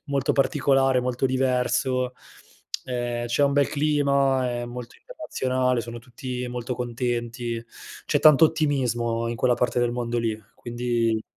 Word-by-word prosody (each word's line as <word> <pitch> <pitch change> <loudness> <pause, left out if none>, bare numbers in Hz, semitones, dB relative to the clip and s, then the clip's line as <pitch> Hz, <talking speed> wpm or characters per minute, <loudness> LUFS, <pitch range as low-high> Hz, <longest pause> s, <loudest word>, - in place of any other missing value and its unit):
molto 140 -2 0
particolare, 135 -2 +2
molto 125 +1 -2
diverso. 130 0 0 0.7
Ehm, 120 -1 -3
c'è 120 +4 +1
un 140 - +2
bel 140 0 +3
clima, 140 -3 +2
è 120 0 -3
molto 120 0 -8
internazionale, 130 - -1
sono 120 0 -7
tutti 125 +1 -6
molto 125 0 -4
contenti, 120 -1 -3 0.4
c'è - - +1
tanto 155 +1 +7
ottimismo 120 -7 0
in 120 - -3
quella 125 +1 +3
parte 125 0 0
del 120 -1 +1
mondo 120 -1 -2
lì, 110 -2 -1 0.2
quindi 120 -2 -1
125 Hz, 135 wpm, -25 LUFS, 120-135 Hz, 0.7 s, tanto